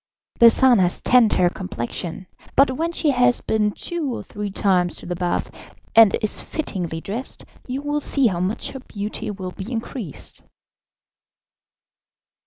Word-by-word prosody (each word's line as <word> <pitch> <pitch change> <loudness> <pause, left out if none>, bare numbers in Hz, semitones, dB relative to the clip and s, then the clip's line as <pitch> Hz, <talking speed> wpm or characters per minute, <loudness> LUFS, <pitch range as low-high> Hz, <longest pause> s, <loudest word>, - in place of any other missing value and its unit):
The 235 - +9
sun 245 -1 +5
has 180 -1 +2
tanned 245 -3 +4
her 180 - +3
complexion, 175 - -5 0.3
but 275 -1 +5
when 325 +6 -2
she 315 -3 +1
has 245 -1 +3
been 215 -1 +1
two 320 +3 -4
or - - -6
three 205 -1 -5
times 185 -3 +1
to - - -9
the 175 - -3
bath, 175 0 -2 0.4
and 225 -4 +7
is 215 - -1
fittingly 175 - -4
dressed, 225 +9 -6 0.2
you 265 +2 -4
will 290 0 -1
see 275 -1 +2
how 185 -7 +1
much 185 +5 -2
her 265 - -7
beauty 210 -5 -5
will 190 -3 -5
be 195 +6 -8
increased." 225 - -6
215 Hz, 155 wpm, -22 LUFS, 185-255 Hz, 0.4 s, The